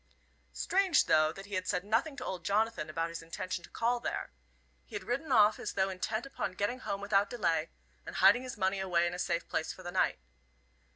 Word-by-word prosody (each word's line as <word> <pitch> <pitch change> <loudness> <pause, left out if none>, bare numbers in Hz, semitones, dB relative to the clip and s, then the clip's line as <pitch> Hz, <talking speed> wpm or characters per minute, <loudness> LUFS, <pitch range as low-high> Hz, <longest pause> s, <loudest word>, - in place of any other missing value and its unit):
Strange, 380 -5 +3
though, 155 0 +4
that 195 +4 -10
he 205 - -11
had 185 -1 -1
said 180 -1 0
nothing 230 +9 0
to 260 -2 -6
old 180 -3 -4
Jonathan 210 -3 0
about 165 +2 -1
his 165 - -6
intention 175 +2 -5
to - - -12
call 240 +1 0
there. - - -3 0.5
He - - -11
had 410 - -4
ridden 275 +5 -2
off 215 -3 +5
as - - -4
though 190 0 +1
intent 215 +6 -2
upon 270 -8 -4
getting 205 +7 -1
home 200 -4 -3
without 200 0 +2
delay, 165 -8 0 0.3
and - - -8
hiding 200 +6 +6
his 255 -2 -7
money 190 0 +1
away 175 -3 +2
in 175 - -1
a 180 - -5
safe 170 -2 -1
place 160 - -1
for 185 - -11
the 175 - -5
night. 185 - +2
195 Hz, 220 wpm, -32 LUFS, 180-230 Hz, 0.5 s, hiding